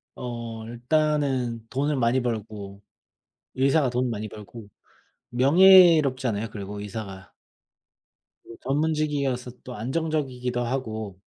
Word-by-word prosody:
어 115 -2 -6
일단은 130 -2 0
돈을 145 +2 0
많이 125 +1 +2
벌고 105 -4 -5 0.7
의사가 135 +2 +2
돈을 125 0 -1
많이 110 -1 -4
벌고 105 +1 -11 0.6
명예롭잖아요 140 - +5
그리고 100 0 -7
의사가. 100 -2 -8 1.1
이 115 - -11
전문직이어서 140 -3 -1
또 125 - -8
안정적이기도 130 -1 -2
하고 110 -6 -4
125 Hz, 250 characters per minute, -25 LUFS, 110-140 Hz, 1.1 s, 명예롭잖아요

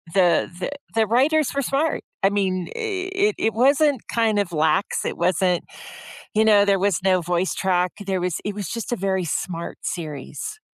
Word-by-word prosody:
The 180 -3 +3
the 185 - -3 0.2
the 220 -1 +3
writers 280 +5 +3
were 280 - +1
smart. 280 +4 0 0.2
I 195 - +6
mean, 185 -3 0
it 395 -2 -1
it 220 - 0
wasn't 275 +2 +3
kind 220 -3 +2
of 195 -3 -1
lax. 160 +4 +1
It - - -2
wasn't 180 0 +1 0.7
you 220 +1 +4
know, 205 -2 +6
there 200 -1 +3
was 195 -4 +1
no 185 -2 +3
voice 175 +2 0
track. 180 -2 +1
There 190 -2 -1
was 180 -2 -1
it 205 - -2
was 205 -4 -4
just 230 0 -4
a - - +1
very 190 -1 -1
smart 170 +1 -4
series. 165 - -5
200 Hz, 180 wpm, -23 LUFS, 180-255 Hz, 0.7 s, I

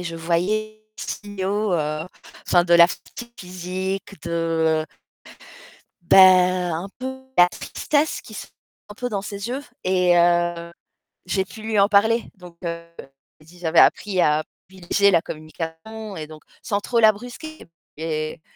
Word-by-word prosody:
et - - -6
je 170 -1 -5
voyais 205 +6 -1 0.2
les - - -7
signaux, 205 0 -3
heu, 155 -1 -2 0.4
enfin 175 -1 +4
de 175 - +4
la 170 0 +9
fatigue 235 +6 -9
physique, 185 +2 -5
de 165 -2 0 1.2
Bah, 175 +3 +4 0.6
un 175 +5 -5
peu 255 - -5
de 265 0 -10
la 175 - +8
tristesse 300 - -1
qui 215 - -13
se - - -7 0.4
un 205 - -10
peu 245 +2 -4
dans 200 -3 -2
ses 200 +1 -6
yeux 260 +4 -4 0.2
et 180 -1 +3
heu, 175 0 +2 0.5
j'ai 190 +1 0
pu 220 - -12
lui 220 -1 0
en 200 - +5
parler. 220 +3 +3
Donc 180 -3 -14
heu, 170 0 -4 0.6
j'ai 155 - -20
dit 175 +2 -17
j'avais 165 -1 +2
appris 200 -3 +3
à 150 +1 +2 0.2
privilégier 190 +2 +1
la 170 -3 +4
communication 165 +7 -7
et 155 -1 -6
donc 155 -1 -12 0.2
sans 205 -5 -1
trop 235 +3 0
la 220 -1 +7
brusquer! 245 +9 -10 0.3
Et 155 -1 -4
185 Hz, 160 wpm, -22 LUFS, 170-215 Hz, 1.2 s, la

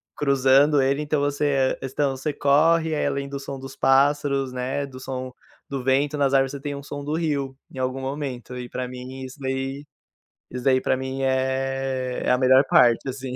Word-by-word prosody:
cruzando 140 +1 +4
ele, 140 +2 +1
então 150 0 0
você 145 -2 +1 0.2
você 140 0 0
corre 160 +3 +3
aí - - 0
além 140 0 -2
do 140 0 -5
som 135 -1 -7
dos 135 0 -9
pássaros, 140 -1 +2
né, 130 +3 -2
do 130 -2 -11
som 130 0 -5 0.4
do 135 -2 -4
vento 140 +3 +1
nas 140 -1 +2
árvores 135 -1 +3
você 140 - -5
tem 145 0 -4
um 140 - -8
som 145 0 -7
do 150 - -3
rio, 145 -5 -1 0.2
em - - -12
algum 130 +1 -2
momento 130 -3 -5
e 125 -1 -7
para 130 0 -4
mim 125 +1 -8
isso 130 +2 -10
daí, 135 +2 -3 0.6
isso 125 0 -6
daí 130 -1 +3
para 130 - +1
mim 130 +1 -4
é 130 -1 -1
é - - +2
a 125 - +4
melhor 130 +1 +5
parte 120 +2 +4
assim. 130 -1 -5
135 Hz, 195 wpm, -24 LUFS, 130-140 Hz, 0.6 s, melhor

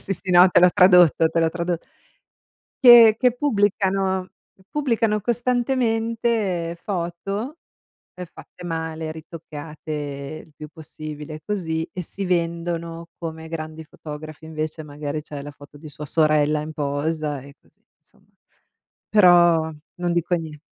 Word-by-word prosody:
sì, 195 - -3
sì, 185 +1 -5
no, 180 +1 +8
te 175 - +4
l'ho 180 0 +7
tradotto 180 -3 +6
te 165 +1 0
l'ho 165 - +3
tradot 170 0 -3 1.0
che 235 -3 +9
che 250 -2 +3
pubblicano 195 -6 0 0.4
pubblicano 230 -7 0
costantemente 230 -6 0
foto 195 - -4 0.6
ehm 180 - -7
fatte 180 +1 -15
male, 160 -1 -4
ritoccate 150 -2 -7
il 160 - -23
più 150 +1 -9
possibile 155 -1 -9
così, 165 -5 -2
e 185 - -4
si 195 +3 -6
vendono 170 -1 -2
come 160 -1 -7
grandi 160 -1 -6
fotografi 155 0 -10
invece 155 0 -5
magari 150 0 -5
c'è 150 -2 -8
la 145 +1 -8
foto 145 +1 -15
di 155 +2 -11
sua 150 +1 -8
sorella 150 0 +2
in 155 +1 -7
posa 150 +1 -2
e 140 +1 -14
così, - - -30 0.2
insomma. - - -22 0.8
Però 175 -5 +5 0.2
non 175 -1 -2
dico 175 +1 +1
nie 160 -3 -6
165 Hz, 135 wpm, -22 LUFS, 155-190 Hz, 1.0 s, che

